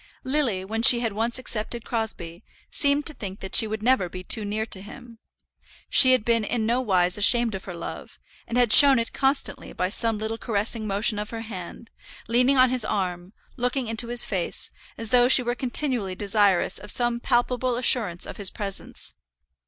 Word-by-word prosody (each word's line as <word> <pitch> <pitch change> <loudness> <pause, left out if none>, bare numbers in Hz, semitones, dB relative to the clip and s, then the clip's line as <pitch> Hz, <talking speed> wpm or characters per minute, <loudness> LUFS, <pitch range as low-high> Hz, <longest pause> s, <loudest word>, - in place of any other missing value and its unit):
Lily, 260 -9 -2
when 220 +3 -4
she 240 0 +8
had 225 -3 -3
once 230 +3 -2
accepted 235 -2 -3
Crosbie, 185 -7 -6 0.3
seemed 285 0 0
to 305 - -2
think 195 -6 -8
that 190 - -9
she 220 - +5
could 215 0 -6
never 245 -7 +1
be 185 +1 -9
too 220 +3 0
near 210 +2 -4
to 190 -4 -4
him. 230 +2 -14 0.7
She 260 -1 +8
had 255 -4 0
been 230 -2 +1
in 220 +1 -3
no 240 +3 0
wise 185 -4 0
ashamed 235 +2 +4
of 190 - -8
her 180 - -8
love, 170 - -9 0.3
and 235 - -4
had 245 -3 +3
shown 280 -2 +9
it 230 0 -4
constantly 270 +1 -2
by 180 - -3
some 225 +1 +2
little 220 +1 -5
caressing 220 0 -1
motion 205 +2 -1
of 210 +1 -6
her 225 -1 -7
hand, 215 +1 -10 0.4
leaning 250 +4 +2
on 255 -1 +4
his 255 -3 -1
arm, 185 -2 -4 0.2
looking 250 +1 -2
into 225 +1 -2
his 240 0 +3
face, 185 -4 -4 0.3
as 225 -1 -2
though 245 -1 +4
she 255 0 +7
were 240 0 -2
continually 245 -6 -2
desirous 200 -2 0
of 205 +1 -13
some 240 +1 +2
palpable 245 +1 -1
assurance 225 -8 +2
of - - -10
his 200 -2 -1
presence. 195 -1 -5
225 Hz, 190 wpm, -23 LUFS, 200-245 Hz, 0.7 s, shown